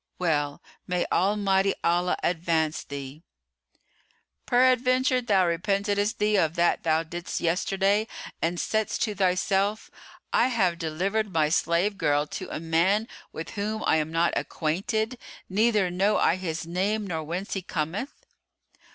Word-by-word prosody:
"Well, 145 Hz, -5 st, -1 dB, 0.2 s
may 180 Hz, -1 st, 0 dB
Almighty 195 Hz, 0 st, +2 dB
Allah 175 Hz, +1 st, +2 dB
advance 160 Hz, -2 st, 0 dB
thee!" 140 Hz, +1 st, -8 dB, 1.3 s
"Peradventure 255 Hz, +1 st, +3 dB
thou 200 Hz, -6 st, +3 dB
repentedest 200 Hz, +5 st, 0 dB
thee 210 Hz, 0 st, +2 dB
of 165 Hz, -3 st, +1 dB
that 170 Hz, 0 st, +2 dB
thou 160 Hz, 0 st, +1 dB
didst 175 Hz, +3 st, -5 dB
yesterday 195 Hz, +5 st, +1 dB, 0.3 s
and 170 Hz, +1 st, 0 dB
saidst 220 Hz, -1 st, 0 dB
to 215 Hz, -, -1 dB
thyself: 195 Hz, +2 st, 0 dB, 0.4 s
I 240 Hz, -, +4 dB
have 190 Hz, -9 st, +1 dB
delivered 190 Hz, +6 st, -1 dB
my 155 Hz, -3 st, +2 dB
slave 175 Hz, +5 st, +1 dB
girl 145 Hz, 0 st, +2 dB
to 185 Hz, +4 st, -7 dB
a -, -, -4 dB
man 170 Hz, +7 st, +1 dB, 0.2 s
with 160 Hz, -, -7 dB
who 215 Hz, +1 st, -3 dB
I -, -, +3 dB
am 155 Hz, 0 st, -1 dB
not 165 Hz, +1 st, +1 dB
acquainted, 220 Hz, +9 st, -2 dB, 0.3 s
neither 210 Hz, -2 st, +2 dB
know 195 Hz, +4 st, +2 dB
I 170 Hz, -, +3 dB
his 165 Hz, -4 st, -4 dB
name 200 Hz, +5 st, -1 dB
nor 165 Hz, -5 st, -3 dB
whence 175 Hz, +6 st, -4 dB
he 195 Hz, -, -2 dB
cometh?" 180 Hz, -, -4 dB
185 Hz, 135 wpm, -26 LUFS, 165-210 Hz, 1.3 s, I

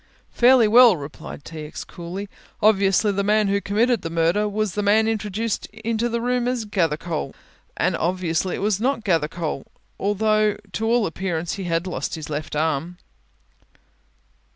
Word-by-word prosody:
"Fairly 245 Hz, -2 st, +5 dB
well," 235 Hz, -2 st, +7 dB
replied 145 Hz, 0 st, -9 dB
T. 160 Hz, -1 st, -8 dB
X. 150 Hz, -, -7 dB
coolly; 180 Hz, +4 st, -7 dB, 0.3 s
"obviously 205 Hz, 0 st, +3 dB
the 200 Hz, 0 st, -1 dB
man 210 Hz, 0 st, +2 dB
who 200 Hz, 0 st, +1 dB
committed 225 Hz, +2 st, +1 dB
the 165 Hz, -, -4 dB
murder 170 Hz, +6 st, +1 dB
was 210 Hz, -1 st, -1 dB
the 210 Hz, -, -1 dB
man 215 Hz, +2 st, +3 dB
introduced 220 Hz, 0 st, -2 dB
into 230 Hz, +1 st, -2 dB
the 235 Hz, 0 st, -1 dB
room 245 Hz, +1 st, 0 dB
as 250 Hz, -3 st, -1 dB
Gathercole 165 Hz, -5 st, -2 dB, 0.4 s
and -, -, +1 dB
as -, -, -3 dB
obviously 175 Hz, 0 st, 0 dB
it -, -, -5 dB
was 210 Hz, -1 st, +1 dB
not 260 Hz, -1 st, 0 dB
Gathercole, 165 Hz, -5 st, -1 dB, 0.4 s
although 215 Hz, +1 st, +1 dB
to 225 Hz, -, -2 dB
all 235 Hz, -1 st, +3 dB
appearance, 170 Hz, -1 st, -3 dB
he 195 Hz, -, -5 dB
had 165 Hz, 0 st, 0 dB
lost 180 Hz, -, -3 dB
his 155 Hz, -1 st, -7 dB
left 150 Hz, +1 st, -4 dB
arm." 160 Hz, +3 st, -1 dB
200 Hz, 160 wpm, -23 LUFS, 170-220 Hz, 0.4 s, well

